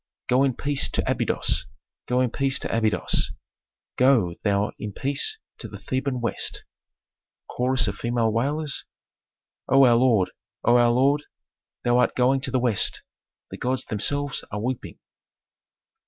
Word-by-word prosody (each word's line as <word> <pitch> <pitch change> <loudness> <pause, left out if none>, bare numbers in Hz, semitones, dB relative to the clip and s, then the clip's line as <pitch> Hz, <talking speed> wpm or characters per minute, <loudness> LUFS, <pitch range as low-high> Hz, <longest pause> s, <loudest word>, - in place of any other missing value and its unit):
_ - - -67
"Go 125 +2 +3
in 135 -3 +2
peace 145 -1 0
to - - -2
Abydos! - - 0 0.4
Go 125 +1 +2
in 125 -3 +1
peace 135 +1 0
to - - -3
Abydos! 110 -2 +1 0.6
Go 125 -9 +4
thou 100 0 +1
in 105 -1 -5
peace 140 - -1 0.2
to - - -6
the - - -9
Theban 130 0 -2
West!" 115 - -2 0.8
Chorus 125 -1 0
of 100 -1 -3
female 120 -1 0
wailers. 145 +5 -1 0.9
"O 135 +1 +7
our 120 - +6
lord, 115 -6 +3 0.3
O 120 +1 +5
our 120 0 +5
lord, 140 +5 +2 0.6
thou 120 0 +3
art - - +2
going 130 +2 +3
to 135 - -3
the 130 - +1
West, 120 -5 +1 0.5
the - - -6
gods 130 +1 -2
themselves 145 +6 -2
are 105 - -4
weeping." 125 +3 -4
125 Hz, 150 wpm, -24 LUFS, 115-135 Hz, 0.9 s, O